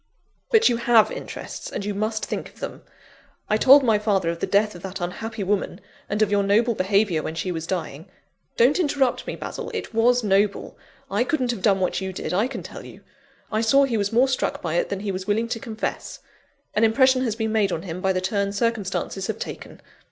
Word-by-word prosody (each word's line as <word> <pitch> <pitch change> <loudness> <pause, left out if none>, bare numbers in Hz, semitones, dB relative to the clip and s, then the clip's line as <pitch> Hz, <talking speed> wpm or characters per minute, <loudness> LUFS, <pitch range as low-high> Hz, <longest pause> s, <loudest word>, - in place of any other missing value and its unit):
"But 450 0 +5
you 240 - +2
have 235 -2 +4
interests, - - -7
and 200 - -4
you 205 - -2
must 215 +2 -2
think - - -4
of - - -21
them. - - -6 0.7
I 215 - +2
told 270 +5 +7
my 220 -4 +3
father 195 -5 +1
of 170 - -7
the - - -2
death 210 +1 +2
of 175 - -11
that 190 +1 -6
unhappy 215 +5 -4
woman, 200 +1 -1 0.3
and 210 +2 +2
of 205 - -1
your 205 0 +3
noble 215 +4 +3
behaviour 195 -4 +1
when 160 - -5
she 180 +2 -2
was 165 -1 -4
dying. 165 -4 -4 0.5
Don't 255 +9 +4
interrupt 280 -6 +1
me, - - -3
Basil - - -6
it 440 - -5
was 245 +2 +3
noble; 200 0 +1 0.4
I 205 +4 +2
couldn't 255 -3 0
have 230 -5 -5
done 195 -1 +3
what 185 +1 -1
you 190 0 -4
did, 180 - -4
I 205 +6 +2
can 270 - -7
tell - - -9
you! - - -12 0.5
I 215 0 +1
saw 275 +5 +4
he 260 -4 0
was 205 -2 0
more 245 +4 +4
struck 260 -1 -1
by 165 -3 -3
it 175 - 0
than 200 -1 -3
he 205 -1 -2
was 185 0 -5
willing 220 +3 +1
to 235 -1 -2
confess. 225 -4 -5 0.6
An 215 - +2
impression 260 +3 +4
has 230 -4 -1
been 220 -1 -2
made 210 -3 +2
on 165 - -3
him 180 -1 -6
by 190 - +2
the 185 -1 -1
turn 200 +1 -1
circumstances 200 -3 -2
have 220 -1 -3
taken. - - -8
210 Hz, 225 wpm, -23 LUFS, 190-235 Hz, 0.7 s, told